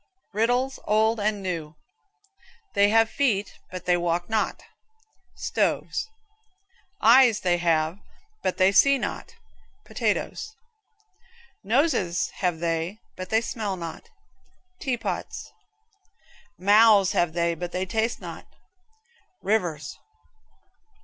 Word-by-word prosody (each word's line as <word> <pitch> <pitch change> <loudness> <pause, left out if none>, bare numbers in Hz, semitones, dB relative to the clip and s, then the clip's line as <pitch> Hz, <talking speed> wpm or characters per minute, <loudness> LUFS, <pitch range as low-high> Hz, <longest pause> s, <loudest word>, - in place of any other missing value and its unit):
RIDDLES, 245 +5 +1
OLD 220 +1 +2
AND 205 -1 -1
NEW. 165 -4 -4 1.0
Feet 200 +1 +4
have 225 0 +5
they, 230 -8 +2 0.3
but 180 -1 -7
they 180 - +3
walk 175 0 -1
not 220 -1 -1 0.7
stoves. - - -1 0.9
Eyes 240 -1 +6
have - - -22
they, 175 0 +1 0.4
but 185 - -1
they 185 +1 +5
see 275 +7 +5
not - - -5 0.5
potatoes. 440 - -2 1.1
Noses 210 - +1
have 180 -3 0
they, 165 +3 -2 0.2
but 185 0 -7
they 220 +1 +3
smell 210 -4 -3
not 170 - -8 0.7
tea 260 -4 -1
pots. - - -5 1.1
Mouths 205 0 +5
have 175 -2 +1
they, 170 0 +1
but 175 +1 -6
they 185 +1 -2
taste 220 +5 -1
not - - -9 1.0
rivers. 180 -7 -1
195 Hz, 105 wpm, -25 LUFS, 175-225 Hz, 1.1 s, Eyes